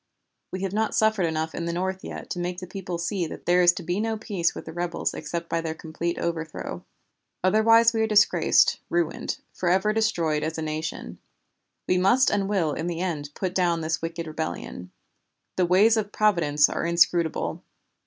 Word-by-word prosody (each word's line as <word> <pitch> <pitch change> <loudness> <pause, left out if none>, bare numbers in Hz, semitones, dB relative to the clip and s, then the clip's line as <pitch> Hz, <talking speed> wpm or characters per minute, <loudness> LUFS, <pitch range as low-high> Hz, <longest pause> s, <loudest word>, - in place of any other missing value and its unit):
We 185 +1 -4
have 195 -1 -2
not 220 +1 0
suffered 215 -5 +2
enough 160 0 -2
in 170 - -4
the 170 - -2
North 190 +2 -3
yet - - -8
to 180 - -3
make 175 0 -3
the 185 - -6
people 180 -1 -5
see 170 +1 -2
that - - -9
there 180 +1 +4
is 175 0 +7
to - - -7
be 175 +4 -2
no 220 0 -1
peace 200 -6 -1
with - - -7
the 160 - -8
rebels 175 0 -2
except 170 0 -5
by 165 0 -1
their 160 -1 -4
complete 170 +2 -4
overthrow. 160 -2 -4 0.6
Otherwise 225 +4 +5
we 225 - 0
are 220 - +2
disgraced, 210 -1 +4
ruined, 170 -2 -1 0.2
forever 190 +4 +1
destroyed 170 -9 +1
as 155 +1 -3
a 160 - -3
nation. 155 0 -5 0.7
We 180 - +2
must 240 +9 +4
and 200 -1 0
will 175 -7 +1
in 160 +3 -3
the 170 -1 -3
end 160 -6 -3
put 185 -2 -3
down 175 -3 +1
this 160 0 -2
wicked 165 0 -4
rebellion. 90 - -5 0.6
The 180 -1 +2
ways 205 +6 +5
of 210 -2 -2
Providence 165 -9 +3
are - - -3
inscrutable. 170 -1 +1
175 Hz, 190 wpm, -25 LUFS, 165-195 Hz, 0.7 s, is